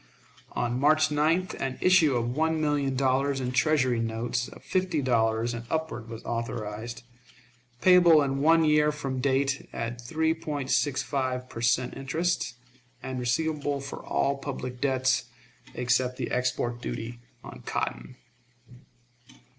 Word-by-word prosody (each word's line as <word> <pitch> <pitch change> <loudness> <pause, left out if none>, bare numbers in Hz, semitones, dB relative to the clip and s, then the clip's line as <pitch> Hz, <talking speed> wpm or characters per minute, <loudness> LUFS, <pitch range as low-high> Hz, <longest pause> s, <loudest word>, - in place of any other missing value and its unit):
On 120 +1 -1
March 155 +2 +4
9th 160 +5 +1
an 130 -1 -2
issue 175 -7 +5
of 120 +1 -1
one 160 +1 +1
million 145 -3 0
dollars 135 +1 +1
in 125 -1 -2
Treasury 130 -3 +2
notes 115 +1 -2
of - - -13
fifty 185 -4 0
dollars 115 -3 +1
and 115 0 -5
upward 160 -8 -3
was 115 -1 -8
authorized, 115 0 -4 0.8
payable 175 -4 +7
in 135 0 -1
one 165 +2 +5
year 150 -1 +4
from 135 -3 -4
date, 135 +1 0
at 115 +1 -4
3.65 140 -3 -1
per 115 - -8
cent. 125 +1 +2
interest, 140 0 -1 0.5
and 130 -1 -4
receivable 145 +3 -1
for 140 0 -7
all 140 0 0
public 130 -3 -6
debts 130 -2 +1 0.5
except 125 +1 +1
the - - -3
export 120 -1 -1
duty 120 0 -5 0.2
on - - -10
cotton. 130 - -3
135 Hz, 130 wpm, -27 LUFS, 120-150 Hz, 0.8 s, payable